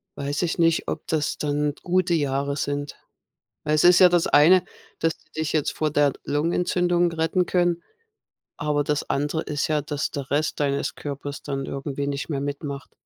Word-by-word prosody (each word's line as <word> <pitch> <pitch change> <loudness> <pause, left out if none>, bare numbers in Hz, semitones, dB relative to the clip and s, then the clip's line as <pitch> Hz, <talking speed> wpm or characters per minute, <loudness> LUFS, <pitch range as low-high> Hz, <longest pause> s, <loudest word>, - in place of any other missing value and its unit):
weiß 140 +1 -2
ich 175 -1 -1
nicht, 165 -1 +2
ob 155 - -5
das 155 -2 -1
dann 145 0 0
gute 180 0 +1
Jahre 140 -2 0
sind. 145 0 -3 0.7
Weil 150 - +1
es 155 - +3
ist 175 0 +7
ja 185 - +8
das 175 -1 +2
eine, 175 +5 +6 0.4
dass 165 -1 0
die - - -31
dich 160 0 -1
jetzt 155 -3 0
vor 155 -1 -1
der 145 -1 +3
Lungenentzündung 175 +3 +1
retten 165 +2 +1
können, 175 -1 +1 0.7
aber 145 0 0
das 150 0 -1
andere 150 +3 0
ist 145 -1 -2
ja, 155 -1 +1
dass 145 0 -3
der 140 -2 -5
Rest 150 +2 0
deines 140 -1 0
Körpers 145 -1 -6
dann 135 -1 -4
irgendwie 140 0 -4
nicht 140 0 -3
mehr 145 -4 -2
mitmacht. 140 0 -5
150 Hz, 180 wpm, -24 LUFS, 145-165 Hz, 0.7 s, ja